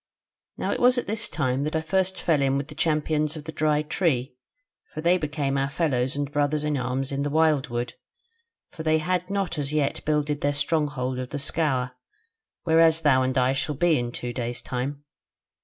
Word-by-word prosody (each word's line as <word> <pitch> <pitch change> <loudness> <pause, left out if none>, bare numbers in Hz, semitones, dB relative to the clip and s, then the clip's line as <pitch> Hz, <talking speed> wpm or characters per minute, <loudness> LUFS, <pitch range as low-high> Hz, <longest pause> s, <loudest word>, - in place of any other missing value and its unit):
"Now - - -1
it - - -1
was 250 +1 +5
at 245 - 0
this 220 +2 -1
time 140 -3 0
that 155 +2 -2
I 160 - +1
first 190 +4 0
fell 155 -4 +2
in 135 0 +2
with 140 +1 -4
the - - -8
Champions 155 0 0
of 155 - -7
the 160 - -6
Dry 150 -1 +1
Tree; 150 -6 0 0.6
for - - -7
they 170 +3 +4
became 145 -3 -1
our 135 0 0
fellows 135 -4 0
and 145 0 -2
brothers 145 +1 +1
in 150 -1 0
arms 130 +1 -2
in 140 0 -1
the 145 - 0
wildwood: 140 -6 +1 0.8
for 170 - -8
they 160 0 +3
had 180 +3 -1
not 195 -5 -1
as 140 -1 -2
yet 150 -2 0
builded 150 -1 0
their 145 0 +1
stronghold 145 -4 0
of 125 -1 -4
the 145 - -4
Scaur, 140 -3 0 0.7
whereas 165 -1 +4
thou 140 -4 +4
and 130 0 0
I 130 +1 +3
shall 135 +2 -2
be 165 0 +3
in 120 0 -3
two 120 0 -5
days 120 -1 -4
time. 135 +3 -4
145 Hz, 200 wpm, -25 LUFS, 135-160 Hz, 0.8 s, was